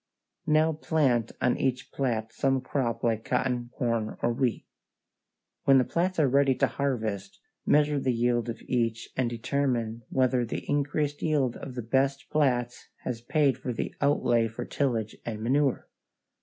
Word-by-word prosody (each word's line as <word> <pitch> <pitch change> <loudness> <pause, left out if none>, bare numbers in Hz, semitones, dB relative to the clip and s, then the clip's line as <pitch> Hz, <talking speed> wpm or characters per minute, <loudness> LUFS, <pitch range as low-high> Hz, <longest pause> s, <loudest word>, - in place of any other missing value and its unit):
Now 155 +1 +4
plant 140 -7 +1
on 125 - +2
each 130 -1 -1
plat 115 -5 -2
some 135 -1 +1
crop 125 -3 -2
like 115 -2 +1
cotton, 125 -2 -1
corn, 115 -3 -1
or 120 - +2
wheat. 120 -1 -1 1.0
When 135 -1 +7
the 130 - +5
plats 180 +6 -1
are 150 - +4
ready 135 0 +3
to - - +3
harvest, 110 -8 -3 0.3
measure 150 -1 +3
the 130 -1 +1
yield 120 0 +1
of 115 - -6
each 115 -2 -1
and 130 -2 +1
determine 120 -1 -1
whether 130 -1 +2
the 115 - -5
increased 145 0 0
yield 140 -6 +1
of 130 -2 -8
the 120 - -4
best 135 +4 0
plats 125 -5 0 0.2
has 120 -3 -4
paid 135 0 +2
for 130 -1 -3
the - - -3
outlay 120 -5 +3
for 110 - -6
tillage 115 -6 -1
and 110 -2 -5
manure. 135 +2 +1
125 Hz, 155 wpm, -28 LUFS, 115-140 Hz, 1.0 s, When